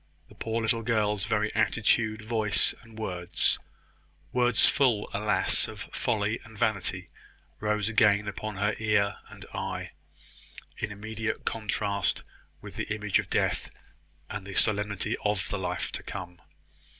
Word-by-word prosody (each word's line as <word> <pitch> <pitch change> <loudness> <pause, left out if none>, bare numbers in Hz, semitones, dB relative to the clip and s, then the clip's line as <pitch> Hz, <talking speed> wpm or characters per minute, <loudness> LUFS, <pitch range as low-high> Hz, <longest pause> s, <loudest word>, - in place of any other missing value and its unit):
The - - -15
poor 115 0 -2
little 115 +1 +2
girl's 105 -3 +1
very 105 0 0
attitude, 110 0 +2
voice, 110 -2 +3
and 110 -1 -15
words 90 -5 +1 0.7
words 125 -1 +5
full, 125 -7 +3
alas! 105 +1 +2
of - - -8
folly 110 -1 0
and 110 -2 -13
vanity 100 -5 0 0.5
rose 105 -1 0
again 105 -2 +4
upon 105 +1 -4
her 100 +1 +2
eye 105 -1 +2 0.2
and - - -11
ear, - - -4 0.9
in 115 - -2
immediate 110 +2 -4
contrast 100 -3 0 0.4
with - - -9
the - - -3
image 105 -2 +1
of - - -4
death, - - +1 0.6
and 100 -2 -6
the 95 - -7
solemnity 105 -2 +1
of 105 -2 +1
the 100 - -2
life 90 -1 -2
to - - -4
come. 90 -1 -7
105 Hz, 140 wpm, -28 LUFS, 100-110 Hz, 0.9 s, words